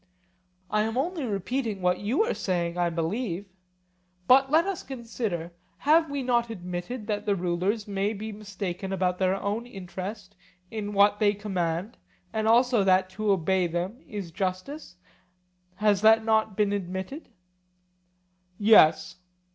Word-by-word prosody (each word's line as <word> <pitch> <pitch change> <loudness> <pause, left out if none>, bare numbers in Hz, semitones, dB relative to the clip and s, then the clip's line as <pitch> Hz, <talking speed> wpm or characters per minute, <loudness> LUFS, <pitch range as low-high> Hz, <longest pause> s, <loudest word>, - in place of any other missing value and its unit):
I 210 0 +2
am 225 +2 -1
only 320 +1 -1
repeating 220 +1 -2
what 180 0 +1
you 235 - +1
are 450 - -1
saying, 175 -2 -2
I 175 -1 +1
believe. 175 +4 -2 0.8
But 270 +1 +6
let 320 +4 +4
us 390 -3 -3
consider: 225 -9 -4 0.3
Have 320 +2 +3
we 280 -1 -3
not 240 -2 +1
admitted 180 +3 -5
that 210 0 -3
the 200 - +3
rulers 185 +4 -1
may 200 +1 -1
be 220 +1 -6
mistaken 195 -3 -5
about 180 -1 0
their 190 0 +2
own 205 +4 -3
interest 195 -1 -7 0.4
in 210 -2 -4
what 205 +1 +4
they 205 -1 +3
command, 185 -1 -3 0.4
and 220 0 0
also 240 -1 +4
that 185 0 +3
to 210 +2 0
obey 185 0 +2
them 180 - -4
is 200 -5 -6
justice? 190 - -4 0.8
Has 205 -1 +2
not 220 0 +5
that 220 -2 +2
been 205 -1 +1
admitted? 190 - -5 1.3
Yes. 205 -7 +5
205 Hz, 140 wpm, -27 LUFS, 185-225 Hz, 1.3 s, But